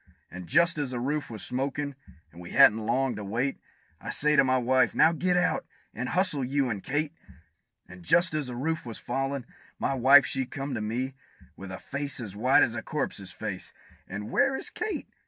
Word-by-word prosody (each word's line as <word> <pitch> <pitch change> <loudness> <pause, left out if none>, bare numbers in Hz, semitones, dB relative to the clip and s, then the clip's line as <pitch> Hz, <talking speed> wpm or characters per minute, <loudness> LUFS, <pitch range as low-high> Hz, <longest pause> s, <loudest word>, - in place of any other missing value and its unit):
And 90 0 -8
just 170 - +3
as 145 -3 -1
the 125 -1 -3
roof 145 +4 -2
was 110 -3 -6
smokin', 140 +3 -2 0.4
and 85 - -12
we 85 - -9
hadn't 110 +1 +6
long 130 +2 +1
to 105 - -5
wait, 120 +7 -2 0.4
I - - -8
says 150 0 +3
to - - +7
my 130 0 +2
wife, 130 +1 +2
"Now 160 - +6
get 180 +2 +1
out, 180 0 +1 0.3
and 125 +3 -4
hustle, 180 -6 +1
you 135 0 0
and 100 -3 -4
Kate!" 145 +2 -1 0.7
And 90 0 -12
just 170 - +3
as 150 -3 -1
the 125 - -6
roof 155 +5 -2
was 115 -2 -6
fallin', 135 +1 -3 0.3
my - - -1
wife 135 +1 +7
she 130 -1 -1
come 135 +1 -5
to 110 - -3
me, 125 +5 -2 0.4
With 95 -1 -9
a 95 - -5
face 140 -1 -3
as 105 -5 -6
white 125 +6 +4
as 115 - +1
a 115 - -4
corpse's 110 - -4
face, 105 -4 -6 0.3
and 105 +3 -6
"Where 270 - +3
is - - -3
Kate?" 435 -1 -4
130 Hz, 205 wpm, -27 LUFS, 110-145 Hz, 0.7 s, to